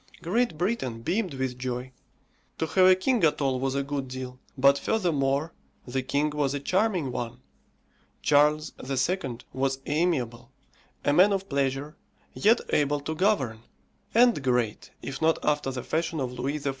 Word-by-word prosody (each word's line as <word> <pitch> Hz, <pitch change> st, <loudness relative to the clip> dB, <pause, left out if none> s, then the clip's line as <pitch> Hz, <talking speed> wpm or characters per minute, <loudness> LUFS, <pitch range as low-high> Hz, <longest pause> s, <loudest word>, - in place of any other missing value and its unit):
Great 190 Hz, 0 st, 0 dB
Britain 150 Hz, -, -2 dB
beamed 180 Hz, -, -1 dB
with 130 Hz, -1 st, -3 dB
joy; 125 Hz, 0 st, -4 dB, 0.7 s
to -, -, 0 dB
have 185 Hz, +3 st, +4 dB
a 185 Hz, -, +7 dB
king 225 Hz, +3 st, +1 dB
at 155 Hz, -, +3 dB
all 135 Hz, -3 st, 0 dB
was 135 Hz, +1 st, -1 dB
a 140 Hz, -, 0 dB
good 140 Hz, -1 st, -3 dB
deal 130 Hz, 0 st, -7 dB, 0.2 s
but 140 Hz, +1 st, +5 dB
furthermore, 155 Hz, -7 st, 0 dB, 0.3 s
the 130 Hz, +1 st, -2 dB
king 145 Hz, +4 st, 0 dB
was 145 Hz, -2 st, 0 dB
a -, -, -2 dB
charming 185 Hz, -, 0 dB
one. 120 Hz, -2 st, -5 dB, 0.8 s
Charles 150 Hz, +1 st, +3 dB
II. 135 Hz, 0 st, -1 dB, 0.2 s
was 135 Hz, 0 st, 0 dB
amiable 135 Hz, -7 st, -1 dB, 0.6 s
a 145 Hz, -, +3 dB
man 185 Hz, +6 st, +6 dB
of 195 Hz, 0 st, -1 dB
pleasure, 140 Hz, +1 st, -1 dB, 0.4 s
yet 220 Hz, +3 st, +3 dB
able 145 Hz, 0 st, +2 dB
to 150 Hz, +3 st, -4 dB
govern; 155 Hz, -, +1 dB, 0.6 s
and 240 Hz, -7 st, +5 dB
great, 125 Hz, -4 st, 0 dB
if 135 Hz, +2 st, -6 dB
not 160 Hz, 0 st, +3 dB
after 150 Hz, -2 st, +1 dB
the 130 Hz, -2 st, -4 dB
fashion 160 Hz, 0 st, -1 dB
of 130 Hz, -2 st, -2 dB
Louis 130 Hz, +4 st, -2 dB
XIV. 145 Hz, -1 st, -2 dB
145 Hz, 160 wpm, -27 LUFS, 130-170 Hz, 0.8 s, a